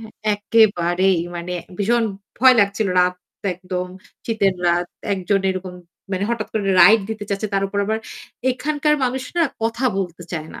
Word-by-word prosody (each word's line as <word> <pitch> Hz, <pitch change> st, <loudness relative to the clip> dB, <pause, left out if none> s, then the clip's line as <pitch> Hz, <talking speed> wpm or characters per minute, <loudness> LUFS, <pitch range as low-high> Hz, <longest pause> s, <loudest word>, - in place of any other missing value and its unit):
হ্যাঁ, 220 Hz, -1 st, -10 dB, 0.2 s
একেবারেই 190 Hz, -4 st, +3 dB, 0.2 s
মানে 175 Hz, +1 st, -5 dB, 0.3 s
ভীষণ 230 Hz, +3 st, +2 dB, 0.3 s
ভয় 255 Hz, +2 st, +7 dB
লাগছিল। 200 Hz, +1 st, +1 dB
রাত 180 Hz, 0 st, +2 dB, 0.4 s
একদম 180 Hz, 0 st, -4 dB, 0.4 s
শীতের 200 Hz, -4 st, +1 dB
রাত, 175 Hz, +1 st, +1 dB, 0.3 s
একজন 195 Hz, +1 st, 0 dB
এরকম 185 Hz, -1 st, -5 dB, 0.4 s
মানে 190 Hz, +1 st, 0 dB
হঠাৎ 230 Hz, -2 st, -2 dB
করে 200 Hz, -3 st, 0 dB
রাইড 215 Hz, +6 st, +7 dB
দিতে 220 Hz, -1 st, -5 dB
চাচ্ছে। 200 Hz, +2 st, -1 dB
তার 195 Hz, -, +1 dB
উপর 200 Hz, +1 st, -3 dB
আবার 220 Hz, +1 st, 0 dB, 0.5 s
এখানকার 300 Hz, +3 st, 0 dB
মানুষ 255 Hz, +1 st, -1 dB
না 340 Hz, -, +4 dB, 0.2 s
কথা 230 Hz, +3 st, -1 dB
বলতে 175 Hz, -2 st, -4 dB
চায় 160 Hz, -2 st, -4 dB
না। -, -, -9 dB
200 Hz, 160 wpm, -21 LUFS, 180-225 Hz, 0.5 s, ভয়